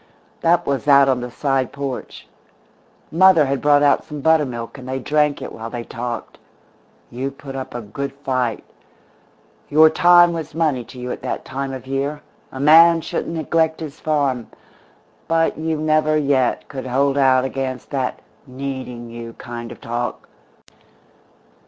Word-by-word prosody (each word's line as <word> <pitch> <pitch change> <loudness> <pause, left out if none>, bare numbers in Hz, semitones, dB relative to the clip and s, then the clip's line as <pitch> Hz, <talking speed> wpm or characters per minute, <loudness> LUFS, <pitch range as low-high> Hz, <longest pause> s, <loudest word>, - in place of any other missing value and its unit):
"That 170 +1 +3
was 140 +1 -2
out 140 -1 +6
on 130 -2 +1
the 125 - -5
side 135 0 -1
porch. 140 -2 -6 0.8
Mother 175 -2 +6
had 135 0 -1
brought 145 0 +4
out 145 - +3
some 150 -1 -8
buttermilk, 140 -6 0
and 130 0 -9
they 130 - -2
drank 150 +2 0
it - - -7
while 115 0 -7
they 120 0 -5
talked. 120 0 -6 0.7
You 130 +3 -3
put 135 0 -10
up 130 -2 -6
a 120 - -3
good 140 +6 -5
fight. 130 -4 -2 1.1
Your 155 +1 +6
time 175 +1 +6
was 160 -2 -6
money 150 -7 0
to 125 +3 -12
you 125 0 -4
at - - -6
that - - -4
time 135 +1 -4
of 130 -1 -7
year; 140 +2 -3 0.3
a 130 - -8
man 165 +3 +7
shouldn't 165 - -4
neglect 160 0 0
his 150 -3 -8
farm 140 -6 0 0.8
but 165 0 +1
you 160 0 -1
never 155 0 +2
yet 140 -4 +1
could 130 -2 -7
hold 135 +2 +1
out 130 -2 +4
against 135 -1 -4
that 130 -3 -2 0.3
'needing 130 -3 -6
you' 115 0 -8
kind 120 0 -8
of - - -11
talk. 120 +1 -4
140 Hz, 160 wpm, -20 LUFS, 130-155 Hz, 1.1 s, man